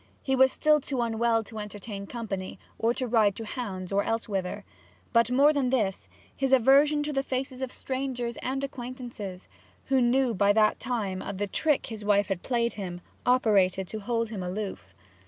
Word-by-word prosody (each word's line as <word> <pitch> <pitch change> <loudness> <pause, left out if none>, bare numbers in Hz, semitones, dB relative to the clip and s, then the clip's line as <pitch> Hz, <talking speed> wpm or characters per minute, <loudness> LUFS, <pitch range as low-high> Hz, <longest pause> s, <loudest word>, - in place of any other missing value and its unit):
He 265 - +1
was 265 0 +5
still 305 -1 +3
too 265 -1 -3
unwell 230 0 +1
to 220 0 -8
entertain 205 -1 -7
company, 195 -6 -5 0.2
or 230 - +2
to 255 - -1
ride 220 -4 +3
to 225 - -6
hounds 195 -6 -5
or 200 +1 +2
elsewhither; 200 -5 -2 0.5
but 230 -1 +4
more 280 +4 +5
than 275 -4 +1
this, 195 - -1 0.3
his 270 -1 -1
aversion 280 +4 +5
to 300 0 -3
the 270 - +1
faces 260 -1 -3
of 260 -1 -3
strangers 255 -3 -3
and 270 +2 -3
acquaintances, 240 -8 -6 0.4
who 265 -1 +4
knew 245 0 +3
by 200 0 +3
that 215 0 +3
time 200 -7 -2
of 200 - -5
the 205 - 0
trick 295 +8 +1
his 220 -2 -7
wife 205 -1 +2
had 190 -3 -2
played 235 -2 0
him, 180 -4 -5 0.3
operated 195 -7 +3
to 220 - -4
hold 230 +1 -1
him 210 -4 -5
aloof. 180 - -5
230 Hz, 180 wpm, -28 LUFS, 200-260 Hz, 0.5 s, was